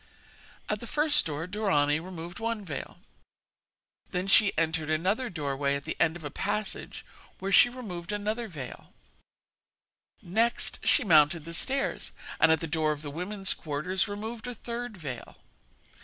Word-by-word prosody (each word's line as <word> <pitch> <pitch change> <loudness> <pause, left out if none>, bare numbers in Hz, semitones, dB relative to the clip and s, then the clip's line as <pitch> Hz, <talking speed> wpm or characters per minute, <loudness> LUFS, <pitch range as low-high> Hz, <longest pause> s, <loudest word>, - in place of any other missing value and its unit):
At 210 - -1
the 235 - -8
first 300 - +3
door 155 +1 -3
Dorani 180 -7 +2
removed 175 +1 -7
one 225 -2 -2
veil; 155 -6 -6 1.1
then 180 +1 -1
she 200 +1 +6
entered 160 -1 +1
another 190 +11 +1
doorway 140 -4 -1
at 140 - -4
the 160 - -3
end 160 0 +3
of 170 - -9
a 145 - -4
passage 210 +4 -3 0.3
where 195 +1 -3
she 240 - +8
removed 205 -8 -6
another 215 +3 -2
veil; 145 -10 -8 1.3
next 225 +7 +1
she 290 - +5
mounted 155 -4 +5
the 165 - -7
stairs, 270 +10 -1 0.3
and 165 - +6
at 160 - +3
the - - -1
door 160 -1 +1
of 150 0 -4
the 145 - -5
women's 195 +5 -1
quarters 165 +7 -1
removed 220 +3 -5
a 245 - -4
third 235 -1 -5
veil. 130 -8 -7
180 Hz, 155 wpm, -29 LUFS, 155-215 Hz, 1.3 s, she